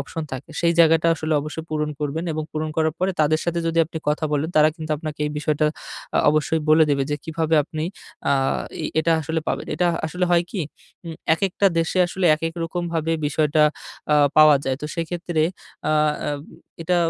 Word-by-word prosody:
option 165 Hz, -, -5 dB
থাকে। 130 Hz, +5 st, -7 dB
সেই 170 Hz, 0 st, +3 dB
জায়গাটা 165 Hz, 0 st, +5 dB
আসলে 155 Hz, 0 st, -3 dB
অবশ্যই 155 Hz, +2 st, -6 dB
পূরণ 150 Hz, -1 st, -1 dB
করবেন 150 Hz, +3 st, -2 dB
এবং 155 Hz, 0 st, -3 dB
পূরণ 155 Hz, 0 st, -2 dB
করার 160 Hz, -1 st, +1 dB
পরে 185 Hz, +1 st, +1 dB
তাদের 155 Hz, +1 st, +2 dB
সাথে 170 Hz, 0 st, -1 dB
যদি 165 Hz, 0 st, 0 dB
আপনি 160 Hz, +1 st, -6 dB
কথা 150 Hz, +2 st, 0 dB
বলেন। 150 Hz, +2 st, 0 dB
তারা 155 Hz, 0 st, +6 dB
কিন্তু 160 Hz, -2 st, -7 dB
আপনাকে 150 Hz, -1 st, -7 dB
এই -, -, -3 dB
বিষয়টা 150 Hz, 0 st, +1 dB, 0.5 s
আ -, -, +4 dB
অবশ্যই 155 Hz, +1 st, +1 dB
বলে 155 Hz, +1 st, +6 dB
দেবে 140 Hz, -1 st, +2 dB
যে 145 Hz, -, 0 dB
কিভাবে 160 Hz, 0 st, -1 dB
আপনি 155 Hz, 0 st, -4 dB, 0.5 s
আ -, -, +5 dB, 0.5 s
এই -, -, -1 dB
এটা 165 Hz, +1 st, +2 dB
আসলে 160 Hz, +1 st, -2 dB
পাবেন। -, -, -2 dB
এটা 180 Hz, -, +1 dB, 0.2 s
আসলে 180 Hz, +3 st, -1 dB
হয় 175 Hz, 0 st, +4 dB
কি? 195 Hz, -, -3 dB, 0.4 s
আম 165 Hz, -1 st, -6 dB, 0.2 s
একেকটা 195 Hz, +3 st, +1 dB
দেশে 165 Hz, +3 st, 0 dB
আসলে 180 Hz, +1 st, -1 dB
একেক 165 Hz, +1 st, -4 dB
রকমভাবে 165 Hz, -1 st, -2 dB
বিষয়টা 150 Hz, 0 st, +2 dB, 0.5 s
আ -, -, +5 dB, 0.2 s
পাওয়া 155 Hz, -1 st, +8 dB
যায়। 130 Hz, -1 st, -1 dB
তো 150 Hz, -, -2 dB
সেক্ষেত্রে 170 Hz, -1 st, -2 dB, 0.5 s
আ -, -, +2 dB, 0.9 s
এটা 180 Hz, +2 st, +1 dB
160 Hz, 185 wpm, -22 LUFS, 155-165 Hz, 0.9 s, পাওয়া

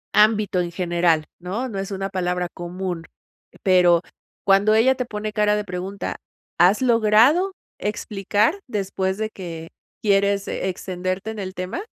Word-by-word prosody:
ámbito 210 Hz, -3 st, +4 dB
en 175 Hz, -1 st, -3 dB
general, 170 Hz, -3 st, +1 dB
¿no? 200 Hz, +9 st, -3 dB
No 200 Hz, -4 st, -4 dB
es 195 Hz, -, -4 dB
una 195 Hz, 0 st, -2 dB
palabra 180 Hz, -1 st, -1 dB
común. 175 Hz, -1 st, -5 dB, 0.6 s
Pero 180 Hz, -3 st, +5 dB, 0.4 s
cuando 200 Hz, +2 st, +5 dB
ella 250 Hz, +4 st, +5 dB
te 250 Hz, -, -2 dB
pone 210 Hz, -2 st, -5 dB
cara 210 Hz, 0 st, +3 dB
de 210 Hz, -, -1 dB
pregunta, 185 Hz, +2 st, -5 dB, 0.4 s
¿has 185 Hz, +7 st, +5 dB
logrado 240 Hz, -, +4 dB, 0.2 s
explicar 210 Hz, -, 0 dB
después 195 Hz, -3 st, -2 dB
de 220 Hz, 0 st, -3 dB
que 165 Hz, -3 st, -7 dB, 0.3 s
quieres 200 Hz, -1 st, +2 dB
extenderte 185 Hz, +2 st, -3 dB
en 220 Hz, -, -7 dB
el 190 Hz, -1 st, -5 dB
tema? 185 Hz, -, -4 dB
195 Hz, 140 wpm, -22 LUFS, 180-215 Hz, 0.6 s, Pero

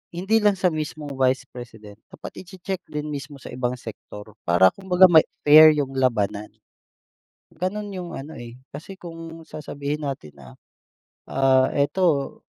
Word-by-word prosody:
hindi 195 Hz, +6 st, +2 dB
lang 210 Hz, -2 st, +3 dB
sa 185 Hz, -1 st, +1 dB
mismong 155 Hz, -1 st, -5 dB
vice 130 Hz, 0 st, +2 dB
president, 110 Hz, -4 st, -11 dB
dapat -, -, -11 dB
iche-check 190 Hz, +1 st, -6 dB
din 150 Hz, 0 st, -5 dB
mismo 140 Hz, 0 st, -7 dB
sa -, -, -10 dB
ibang 125 Hz, 0 st, -2 dB
sektor 110 Hz, -3 st, -11 dB, 0.2 s
para 90 Hz, +2 st, +5 dB
kumbaga 190 Hz, -1 st, +4 dB
may 160 Hz, -1 st, +7 dB, 0.2 s
fair 155 Hz, +1 st, +9 dB
yung 140 Hz, -2 st, -2 dB
labanan. 105 Hz, -5 st, 0 dB, 1.1 s
Ganun 200 Hz, +5 st, -3 dB
yung 180 Hz, -3 st, -6 dB
ano, 145 Hz, +1 st, -8 dB
eh, 120 Hz, +1 st, -10 dB
kasi 150 Hz, +7 st, -9 dB
kung 165 Hz, -1 st, -9 dB
sasabihin 150 Hz, 0 st, -5 dB
natin 75 Hz, -, -6 dB
na, 65 Hz, -2 st, -14 dB, 0.8 s
ah, 130 Hz, -1 st, +3 dB
eto 145 Hz, 0 st, +1 dB
145 Hz, 145 wpm, -23 LUFS, 125-170 Hz, 1.1 s, fair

